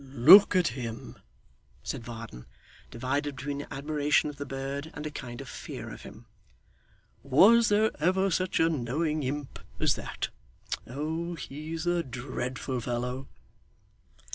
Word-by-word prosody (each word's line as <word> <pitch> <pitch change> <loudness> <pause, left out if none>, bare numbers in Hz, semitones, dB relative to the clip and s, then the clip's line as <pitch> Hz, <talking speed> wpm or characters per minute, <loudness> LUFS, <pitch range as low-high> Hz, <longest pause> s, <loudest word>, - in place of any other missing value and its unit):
'Look 185 - +9
at 180 -3 +4
him!' 115 -2 -6 0.7
said 130 - -4
Varden, 115 - -9 0.4
divided 140 +4 -2
between 140 +2 -4
admiration 150 +1 +1
of 145 - -16
the 145 0 -6
bird 135 +3 -4
and 145 - -6
a 150 - -3
kind 125 -5 -7
of 135 - -9
fear - - -7
of - - -10
him. - - -12 1.0
'Was 205 - +6
there 215 +1 +3
ever 185 +4 +2
such 185 +2 0
a 165 - +5
knowing 155 +2 -1
imp 140 +1 -4 0.2
as - - +3
that! - - -4 0.6
Oh 160 +6 -3
he's 160 +2 -6
a 175 0 +2
dreadful 130 -1 -4
fellow! 125 +2 -3
145 Hz, 135 wpm, -29 LUFS, 130-160 Hz, 1.0 s, Look